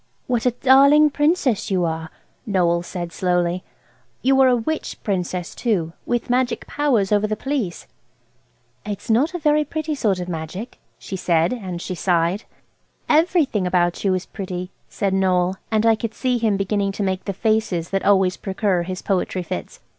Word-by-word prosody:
"What 245 -1 0
a - - +4
darling 280 +3 +7
Princess 295 - +1
you 185 -3 +1
are!" 160 -1 -3 0.4
Noël 170 -3 +2
said 175 -1 -5
slowly. 180 0 0 0.6
"You 270 +1 +4
are 265 - +6
a 250 - +4
witch 300 +7 -3
Princess, 180 -3 -2
too, 180 -9 -1
with 240 -1 -1
magic 250 0 0
powers 250 -10 +1
over 210 0 +3
the 215 - -1
Police." 250 -8 -3 1.0
"It's 205 +2 -4
not 285 +10 +2
a - - 0
very 300 -2 +2
pretty 310 +1 -3
sort 210 -10 0
of 180 - -4
magic," 180 +7 -6 0.2
she 195 - -7
said, 170 0 +1
and 190 -8 -5
she 185 - -5
sighed. 175 +2 0 0.6
"Everything 305 - +2
about 175 -1 +1
you 190 -2 +2
is 185 - -3
pretty," 185 -1 -6 0.2
said 195 -2 -1
Noël. 185 -1 +2
And 220 0 +1
I 225 - +6
could 220 0 -4
see 250 -2 0
him 220 -3 +1
beginning 200 0 0
to 205 - -3
make 190 -1 -2
the 200 - -1
faces 205 -4 0
that 195 0 0
always 190 -2 +3
precur 190 -2 0
his 185 +1 -6
poetry 185 -1 -1
fits. 85 - -6
195 Hz, 170 wpm, -21 LUFS, 180-245 Hz, 1.0 s, darling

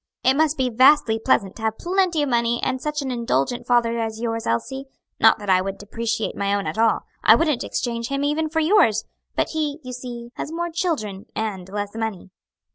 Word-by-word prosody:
"It 260 - +5
must 310 +1 +2
be 255 -2 0
vastly 255 -1 +5
pleasant 195 -3 +1
to - - -10
have 220 0 -1
plenty 355 -3 +1
of 290 - -1
money 235 -1 +1
and 260 0 -1
such 300 0 -2
an 265 - -3
indulgent 235 - -1
father 235 -1 +2
as 220 -1 -3
yours, 230 -1 -2
Elsie. 265 - -2 0.3
Not 225 - +6
that 205 -2 -9
I 185 0 +5
would 195 +1 -4
depreciate 225 +1 -3
my 200 0 0
own 200 - -2
at 220 - -3
all 225 -1 +3 0.2
I - - +8
wouldn't 305 -6 +1
exchange 235 -2 -3
him 275 +1 -2
even 305 +2 0
for 320 +1 0
yours 315 - +3 0.3
but - - 0
he, 300 -2 -2
you 255 0 -7
see, 240 -1 -7
has - - -4
more 340 +1 -3
children 275 - -2
and 195 -4 -3
less 205 0 -4
money." 220 -4 -4
235 Hz, 205 wpm, -23 LUFS, 220-290 Hz, 0.3 s, I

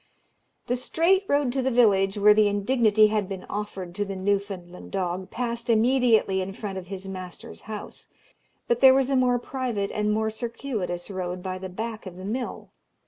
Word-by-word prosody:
The 245 - 0
straight 340 +9 +2
road 285 -3 +1
to 265 - 0
the 260 - +1
village 205 -5 +3
where 210 +1 +7
the 210 0 +4
indignity 215 +1 +3
had 210 -2 -1
been 190 -2 -6
offered 195 -4 -5
to 205 +3 -1
the 195 -1 -5
Newfoundland 190 -2 -3
dog 185 0 -2
passed 235 0 -3
immediately 230 -4 +3
in 190 +1 -4
front 195 -2 -5
of 180 - -11
his 195 0 -6
master's 185 -2 -8
house, 215 -1 -7 0.6
but 235 0 +1
there 265 -1 +8
was 270 0 +2
a - - +3
more 250 -1 +3
private 245 -5 -3
and 210 0 0
more 220 +1 0
circuitous 220 -6 -4
road 180 -1 -4
by 185 -1 -4
the 190 0 -6
back 220 +2 -5
of 180 - -8
the 185 - -8
mill. 240 +5 -4
210 Hz, 185 wpm, -26 LUFS, 190-240 Hz, 0.6 s, there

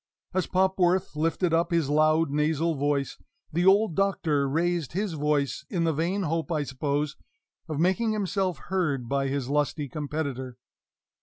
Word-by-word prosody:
As 185 - 0
Popworth 185 -2 +2
lifted 165 +2 0
up 170 +1 +2
his 170 -5 +1
loud, 155 +1 +3
nasal 155 +3 +1
voice, 140 -1 -1 0.3
the 175 +3 +2
old 200 -1 +5
Doctor 155 -7 +1
raised 170 0 0
his 195 0 -1
voice, 145 -3 0
in 175 -3 0
the 165 -1 +2
vain 175 +7 -1
hope, 165 +1 -2
I 155 -3 +1
suppose, 145 +2 -2 0.5
of 155 -2 -2
making 190 +7 +2
himself 195 -4 -1 0.2
heard 145 -10 0
by 135 +1 0
his 135 -2 -2
lusty 145 +1 0
competitor. 140 -3 -4
160 Hz, 150 wpm, -27 LUFS, 145-180 Hz, 0.5 s, old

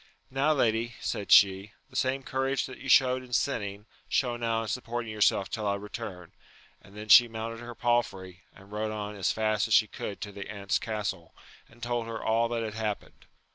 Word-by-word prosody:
Now, 135 +4 +2
lady, 115 -3 +1
said 100 - -3
she, 100 +1 +6 0.2
the - - -16
same 135 +1 0
courage 135 0 -1
that 130 - -10
you 135 - -7
showed 130 0 +5
in 125 -1 -12
sinning, 105 -6 -1 0.2
show 125 -3 +1
now 115 -1 -1
in - - -6
supporting 120 0 -3
your 105 -1 -7
self 100 - +4
till 110 -3 -2
I 100 - +1
return; 100 -4 -7 0.5
and 100 +1 -16
then 105 0 -7
she 120 +4 +9
mounted 115 0 -5
her 120 0 -8
palfrey, 95 -7 -1
and 100 +1 -17
rode 105 +1 -2
on 105 -1 -4
as 95 -2 0
fast 110 0 0
as 110 - +4
she - - +6
could 100 -1 -6
to 105 - -5
the 100 0 -8
aunt's 100 -1 -1
castle, 105 -6 -4 0.3
and 120 +1 -16
told 120 -1 -2
her 115 0 -5
all 115 +1 +1
that 115 -1 -2
had 110 -1 -4
happened. 110 -2 -5
110 Hz, 205 wpm, -28 LUFS, 100-120 Hz, 0.5 s, she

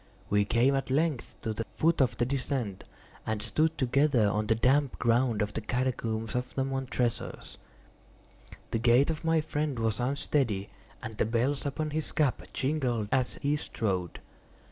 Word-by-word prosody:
We 105 0 +3
came 120 +6 +3
at 135 -1 -1
length 145 -1 0
to 110 - -1
the 115 - -3
foot 165 -2 +2
of 125 -3 +2
the 120 - +2
descent, 125 -6 -2 0.4
and 110 -1 -2
stood 160 +8 0
together 130 -3 +3
on 105 +1 0
the 110 - +3
damp 135 +4 +2
ground 120 -2 +2
of 105 0 -4
the - - -3
catacombs 115 -2 -2
of 125 0 -3
the 135 - +1
Montresors. 130 -3 -3 1.1
The 115 - 0
gait 120 +6 +4
of 160 +1 -6
my 165 -1 +3
friend 150 -3 -2
was 110 -2 0
unsteady, 125 -5 0 0.3
and 110 -1 -6
the - - +3
bells 125 +6 0
upon 155 +2 -3
his 155 +1 -2
cap 145 -5 +1
jingled 130 -7 -1
as 130 -1 +3
he 145 +1 +2
strode. 95 - -3
125 Hz, 165 wpm, -29 LUFS, 115-140 Hz, 1.1 s, gait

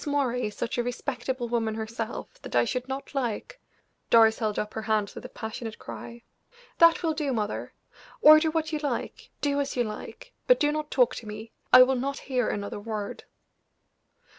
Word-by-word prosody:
Moray 255 -5 0
is 210 - -8
such 240 +1 -3
a - - +2
respectable 245 0 -3
woman 225 -2 -1
herself 225 0 -5
that - - -7
I 120 0 +4
should 250 - -3
not 270 +2 -6
like 260 - -3 0.2
" - - -46
Doris 225 -1 +6
held 215 -3 -1
up 210 - -3
her 220 - -3
hands 215 -2 0
with - - -9
a - - -7
passionate 220 0 -6
cry. 235 0 -9 0.6
"That 335 0 +6
will 320 -1 +1
do, 300 -3 -1
mother! 215 -4 -3 0.5
Order 310 +1 +8
what 315 0 -1
you 305 - 0
like, 295 -1 -4
do 285 -1 +1
as 280 - -2
you 245 - +3
like, 365 - -8
but - - +6
do 295 0 +3
not 305 0 -3
talk 250 -3 +3
to 225 - -8
me; 215 +2 -8 0.2
I 255 - +10
will 260 +1 +2
not 275 +2 -2
hear 250 -4 -1
another 205 0 -4
word." 210 -1 -5
245 Hz, 190 wpm, -27 LUFS, 220-280 Hz, 0.6 s, I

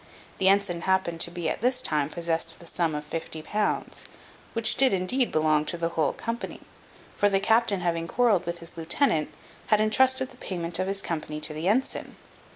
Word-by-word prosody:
The 190 - +3
ensign 195 -3 +2
happened 190 -3 0
to 170 - +4
be 175 -1 -4
at - - -2
this 250 +2 +1
time 150 - +1
possessed 165 0 -2
of - - -17
the 170 - -13
sum 165 -2 -1
of 150 0 -5
fifty 160 0 -5
pounds, 210 +5 -2 0.5
which 230 -1 +3
did 260 -6 +4
indeed 235 +8 +1
belong 155 -1 +2
to 175 - 0
the 165 0 -1
whole 155 -4 0
company; 230 +1 -5 0.5
for 205 - +3
the 195 -1 +2
captain 220 -2 +3
having 170 -1 -1
quarrelled 205 -5 +2
with 170 0 -3
his 170 - -10
lieutenant, 165 - +1 0.4
had 215 - +3
entrusted 260 +4 +3
the 250 - -16
payment 175 -5 -2
of 185 - -1
his 195 0 -2
company 155 -2 -4
to 155 - +2
the 155 +3 -3
ensign. 240 +7 -1
175 Hz, 195 wpm, -26 LUFS, 165-215 Hz, 0.5 s, to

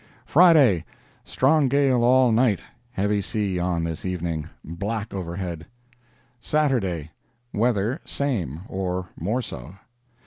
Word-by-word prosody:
Friday—Strong 145 - +3
gale 135 -2 +2
all 125 0 +5
night; 110 -2 +3 0.3
heavy 105 -1 0
sea 100 -3 -2
on 90 -1 0
this 80 -1 -4
evening; 85 -4 -3 0.2
black 100 +6 -4
overhead. 85 -2 -5 0.7
Saturday—Weather 120 - -1
same, 90 - -2
or 90 -1 -3
more 110 +10 -2
so. 75 - -8
100 Hz, 95 wpm, -24 LUFS, 85-125 Hz, 0.7 s, all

